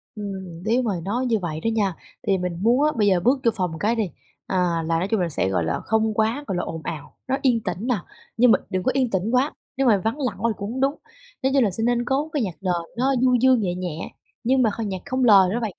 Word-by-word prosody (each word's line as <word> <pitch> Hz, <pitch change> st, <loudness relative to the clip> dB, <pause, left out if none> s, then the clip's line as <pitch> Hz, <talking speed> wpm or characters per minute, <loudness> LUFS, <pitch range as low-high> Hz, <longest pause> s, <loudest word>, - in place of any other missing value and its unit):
Ừm, 190 Hz, -4 st, -7 dB
nếu 230 Hz, +5 st, +2 dB
mà 230 Hz, -, 0 dB
nói 240 Hz, +6 st, -1 dB
như 230 Hz, -3 st, +1 dB
vậy 160 Hz, -4 st, -4 dB
đó 225 Hz, -, -3 dB
nha, 200 Hz, -5 st, 0 dB, 0.3 s
thì 195 Hz, -2 st, +3 dB
mình 180 Hz, -2 st, -3 dB
muốn 240 Hz, +6 st, +3 dB
á, 305 Hz, -, +3 dB
bây 210 Hz, -2 st, +3 dB
giờ 190 Hz, -3 st, +4 dB
bước 250 Hz, +9 st, +2 dB
vô 230 Hz, -, +5 dB
phòng 180 Hz, -5 st, -1 dB
cái 220 Hz, +6 st, +1 dB
đi, 215 Hz, -6 st, -1 dB, 0.4 s
à, -, -, -2 dB, 0.3 s
là 165 Hz, 0 st, +1 dB
nói 185 Hz, -, -1 dB
chung 220 Hz, +1 st, 0 dB
là 175 Hz, -2 st, 0 dB
sẽ, 95 Hz, -10 st, -1 dB
gọi 90 Hz, -3 st, 0 dB
là, 80 Hz, -, -1 dB
không 220 Hz, 0 st, 0 dB
quá, 225 Hz, +7 st, 0 dB
gọi 185 Hz, -, -2 dB
là, -, -, -1 dB
ồn 160 Hz, -, -5 dB
ào, 150 Hz, -3 st, -6 dB
nó 265 Hz, +1 st, +1 dB
yên 245 Hz, -4 st, +3 dB
tĩnh 185 Hz, +6 st, -3 dB
nè. 250 Hz, -, +2 dB, 0.4 s
Nhưng 245 Hz, 0 st, +6 dB
mà -, -, +5 dB
đừng 185 Hz, -1 st, -1 dB
có 260 Hz, -, +2 dB
yên 260 Hz, -3 st, +1 dB
tĩnh 195 Hz, +3 st, -1 dB
quá, 255 Hz, +4 st, +2 dB, 0.2 s
nếu 270 Hz, -1 st, +2 dB
mà 215 Hz, -, +5 dB
vắng 225 Hz, +7 st, -2 dB
lặng 250 Hz, -8 st, -1 dB
quá 230 Hz, +3 st, +1 dB
thì -, -, -2 dB
cũng 205 Hz, +2 st, -4 dB
hông 260 Hz, +1 st, -3 dB
đúng. 275 Hz, +2 st, +2 dB, 0.5 s
Nó 265 Hz, -, +3 dB
như 275 Hz, 0 st, +3 dB
là 215 Hz, -6 st, +3 dB
sẽ 225 Hz, -, -3 dB
nên 240 Hz, 0 st, +1 dB
có 275 Hz, +5 st, 0 dB
cái 285 Hz, -6 st, +1 dB
nhạc 185 Hz, -5 st, -3 dB
nền 185 Hz, -2 st, 0 dB, 0.2 s
nó 265 Hz, +3 st, +2 dB
du 255 Hz, -1 st, +4 dB
dương 255 Hz, 0 st, +4 dB
nhẹ 180 Hz, -3 st, -1 dB
nhẹ, 175 Hz, -3 st, -5 dB, 0.3 s
nhưng 260 Hz, +2 st, +3 dB
mà 225 Hz, -, +4 dB
kh 230 Hz, -, -3 dB
nhạc 190 Hz, -2 st, -4 dB
không 260 Hz, 0 st, -1 dB
lời 195 Hz, -6 st, +7 dB
đó 235 Hz, -, 0 dB
bạn, 220 Hz, -4 st, -2 dB
220 Hz, 285 wpm, -23 LUFS, 185-250 Hz, 0.5 s, lời